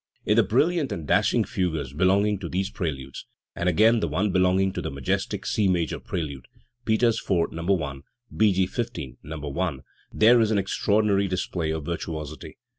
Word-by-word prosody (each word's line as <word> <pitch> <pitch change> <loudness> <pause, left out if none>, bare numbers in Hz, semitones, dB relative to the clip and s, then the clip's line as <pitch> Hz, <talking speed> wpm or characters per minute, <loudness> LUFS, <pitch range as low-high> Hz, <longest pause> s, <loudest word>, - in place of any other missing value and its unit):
In 105 - +3
the 115 - +6
brilliant 145 - +1
and 80 - -4
dashing - - +3
fugues 80 -8 -2
belonging 100 +5 +2
to 85 -4 -6
these 95 +2 -2
preludes, 70 -7 -5 0.3
and 85 - 0
again 110 +6 +4
the 85 - -1
one 95 +7 0
belonging 95 +1 +2
to - - -3
the - - -3
majestic 95 - -2
C 110 -5 +1
major 85 -5 0
prelude 70 -7 -5 0.4
(Peters 115 +1 +2
IV, 85 -4 0
No. 85 +1 0
i; 70 -2 -5 0.4
B. 110 -1 +4
G. 95 0 +2
XV, 95 - -5
No. 75 -1 -6
i) 90 -7 0 0.3
there 115 +2 +5
is 110 - +2
an 110 - +2
extraordinary 100 +1 +1
display 90 -3 -2
of 80 -2 -3
virtuosity. 80 -3 -6
95 Hz, 175 wpm, -25 LUFS, 80-105 Hz, 0.4 s, the